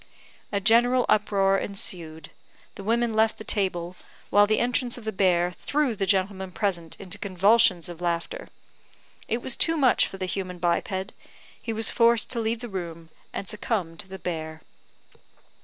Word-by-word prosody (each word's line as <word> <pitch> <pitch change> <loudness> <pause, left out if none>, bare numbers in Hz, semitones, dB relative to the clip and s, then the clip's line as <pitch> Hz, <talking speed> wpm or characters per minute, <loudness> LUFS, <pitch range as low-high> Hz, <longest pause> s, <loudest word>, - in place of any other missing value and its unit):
A 200 - +1
general 240 +5 +4
uproar 195 -2 +3
ensued; 170 -5 -5 0.4
the 195 - -9
women 230 +2 +1
left 220 0 +2
the - - -8
table, 185 -4 -1 0.4
while 205 0 +6
the 215 - +2
entrance 245 0 0
of 245 - -10
the 220 - -1
bear 180 -3 +2
threw 280 - -1
the 195 -1 -2
gentlemen 190 0 0
present 175 -6 -2
into 200 +1 -6
convulsions 195 -1 +3
of 175 -1 -9
laughter. 175 - -2 0.8
It 235 +2 -2
was 260 - +1
too 330 0 +2
much 265 -5 +4
for 195 - -9
the 190 - -3
human 185 -1 -4
biped; 190 +3 -1 0.5
he 230 - -4
was 225 0 +2
forced 235 -1 +3
to 235 - -2
leave 225 +1 -1
the 240 - -5
room, 170 -5 -6 0.2
and 195 - -5
succumb 200 -5 -2
to 195 - -6
the 190 0 -8
bear. 160 -3 -5
195 Hz, 165 wpm, -26 LUFS, 180-225 Hz, 0.8 s, while